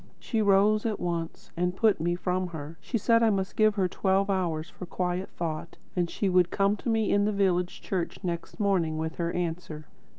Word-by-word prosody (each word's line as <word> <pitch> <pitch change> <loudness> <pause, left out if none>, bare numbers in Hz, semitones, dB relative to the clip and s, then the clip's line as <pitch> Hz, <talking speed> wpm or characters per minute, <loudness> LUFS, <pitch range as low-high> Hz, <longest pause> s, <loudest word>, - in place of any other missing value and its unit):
She 225 -3 -1
rose 205 +1 +4
at 220 -3 -1
once 175 +3 -4
and 180 +1 0
put 210 -4 +3
me 175 +1 +1
from 180 +1 -1
her. 160 -2 -7
She 235 - -2
said 230 +2 +3
I 225 - +5
must 195 -2 -1
give 215 -1 +4
her 190 -3 +2
twelve 195 +2 +1
hours 165 -4 -1
for 180 - -9
quiet 180 +1 -2
thought, 165 0 -5 0.2
and 175 -2 +1
she 200 - -1
would 180 -2 +4
come 200 +1 +2
to 235 - -4
me 220 -2 +2
in 205 0 +3
the 210 - +2
village 180 -3 0
church 180 -3 -2
next 170 +3 -4
morning 180 -6 +1
with 160 +1 -3
her 170 -1 -1
answer. 165 -3 -4
185 Hz, 205 wpm, -28 LUFS, 170-200 Hz, 0.2 s, I